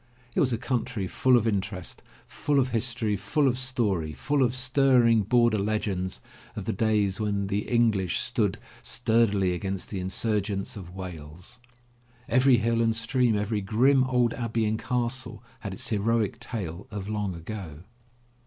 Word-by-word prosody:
It - - 0
was 130 - +3
a 115 - 0
country 115 -4 -2
full 125 +7 +3
of 115 -1 +1
interest, 95 -4 -3 0.2
full 145 -1 -1
of 130 -1 +1
history, 115 -2 0
full 140 +9 +1
of 125 - +2
story, 110 -12 0
full 145 - 0
of 125 -1 +2
stirring 130 -3 +4
border 120 +1 +3
legends 100 -3 -2 0.3
of - - -5
the - - -1
days 105 -1 +1
when 100 -2 -1
the 100 +1 -2
English 110 -7 +2
stood - - 0 0.2
stur 115 -1 +2
dily 95 -3 +1
against 95 +2 -4
the 100 - -3
insurgents 100 +1 -1
of 90 -3 -9
Wales. 90 +4 -9 0.7
Every 130 +1 +5
hill 115 +1 +1
and 115 -1 +2
stream, 115 +1 +2
every 105 +1 -1
grim 130 +7 +3
old 125 -2 +2
abbey 115 -2 -1
and 110 +1 0
castle 120 -1 -2 0.2
had 100 - -6
its 95 - -2
heroic 115 +2 0
tale 95 -7 -5
of 100 -2 -6
long 105 -3 -2
ago. 85 -3 -7
110 Hz, 160 wpm, -27 LUFS, 100-120 Hz, 0.7 s, Every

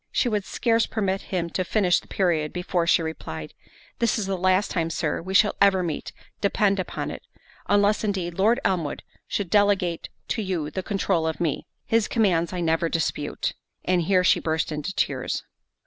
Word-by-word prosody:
She - - +1
would 210 -4 0
scarce 230 -2 +1
permit 195 -3 -1
him 170 -3 -2
to 185 - 0
finish 180 -1 +2
the - - -19
period, 165 -5 0
before 180 -1 -1
she 170 - +4
replied, 80 - -6 0.5
"This 235 0 +2
is 215 - -1
the 195 0 -1
last 185 +2 +2
time, 165 -3 0
Sir, 160 -1 -1
we 190 +3 -5
shall 210 +1 +5
ever 190 -2 +5
meet, 160 -4 -4 0.3
depend 200 -1 +2
upon 185 - -3
it—unless, 205 +2 -1
indeed, 190 -5 -1
Lord 215 +8 +3
Elmwood 170 -6 -1 0.2
should 195 -4 -2
delegate 200 -5 +2 0.2
to 225 - 0
you 175 -7 -2
the 190 - -3
controul 190 -4 0
of 160 - -3
me—his 210 +6 -1
commands 175 -8 +2
I 180 -1 -3
never 165 0 +1
dispute." 165 -2 -2 0.3
And 180 -1 +2
here 185 +2 +3
she - - +4
burst 160 0 -1
into 150 +4 -3
tears. - - -1
185 Hz, 175 wpm, -25 LUFS, 165-200 Hz, 0.5 s, shall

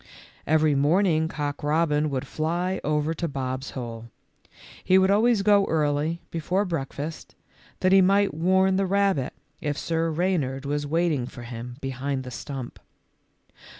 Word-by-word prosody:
Every 155 -1 +3
morning 160 +3 +3
Cock 145 -2 -4
robin 150 0 +1
would 130 -2 -3
fly 175 +4 -2
over 150 +1 0
to 170 +1 -3
Bob's 130 -2 -4
hole. 115 -2 -6 0.7
He 185 - +4
would 190 +1 +4
always 215 0 +3
go 200 -1 +5
early, 155 +1 0
be 165 - -3
fore 185 +6 0
breakfast, 155 -2 -5 0.5
that 185 - +3
he 195 0 +7
might 195 -1 +3
warn 190 +4 +2
the 195 0 +1
rabbit 195 -8 +1 0.3
if 145 -1 -2
Sir 165 0 -1
Reynard 155 -6 -1
was 145 +1 -2
waiting 155 -5 0
for 120 - -10
him 120 +1 -7
behind 135 0 -3
the 125 - -8
stump. 130 +1 -7
155 Hz, 150 wpm, -25 LUFS, 140-185 Hz, 0.7 s, he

